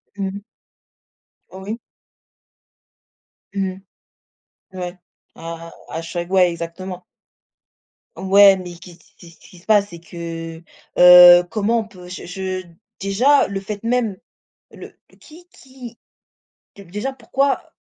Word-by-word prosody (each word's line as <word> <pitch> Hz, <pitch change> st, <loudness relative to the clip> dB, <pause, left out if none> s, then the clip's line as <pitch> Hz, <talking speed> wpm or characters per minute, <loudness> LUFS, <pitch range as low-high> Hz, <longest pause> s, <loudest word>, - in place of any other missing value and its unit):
Mmh 200 Hz, -, -3 dB
mh. 200 Hz, -, -6 dB, 1.1 s
Oui. 195 Hz, +5 st, -7 dB, 1.7 s
Mmh 195 Hz, -1 st, -1 dB, 0.8 s
mh. 190 Hz, -3 st, -16 dB
Ouais. 180 Hz, 0 st, -6 dB, 0.4 s
À 165 Hz, 0 st, -8 dB, 0.2 s
à 165 Hz, -, -5 dB
chaque 175 Hz, +1 st, -5 dB
ouais, 185 Hz, -2 st, +4 dB
exactement. 175 Hz, +2 st, -7 dB, 1.1 s
Ouais, 195 Hz, +2 st, +6 dB
mais 180 Hz, -1 st, -8 dB
que 185 Hz, -, -13 dB
ce 170 Hz, -, -17 dB
que 170 Hz, -, -19 dB
ce -, -, -13 dB
ce -, -, -22 dB
qui 180 Hz, -, -17 dB
se -, -, -23 dB
passe, 205 Hz, -2 st, +3 dB
c'est 170 Hz, -1 st, -11 dB
que 165 Hz, -1 st, -8 dB, 0.3 s
heu, 180 Hz, 0 st, +9 dB
comment 225 Hz, +1 st, +1 dB
on 220 Hz, -, -5 dB
peut 180 Hz, -4 st, -14 dB
je 180 Hz, -, -8 dB
je 185 Hz, 0 st, -5 dB, 0.4 s
déjà 240 Hz, +9 st, +3 dB
le 195 Hz, -1 st, -4 dB
fait 205 Hz, +2 st, -7 dB
même 230 Hz, -5 st, 0 dB, 0.5 s
le -, -, -12 dB, 0.2 s
qui 345 Hz, +3 st, -17 dB
qui 255 Hz, -6 st, -13 dB, 0.8 s
dé 200 Hz, -, -12 dB
déjà 210 Hz, +10 st, -5 dB
pourquoi 270 Hz, +2 st, -2 dB
190 Hz, 130 wpm, -20 LUFS, 175-215 Hz, 1.7 s, heu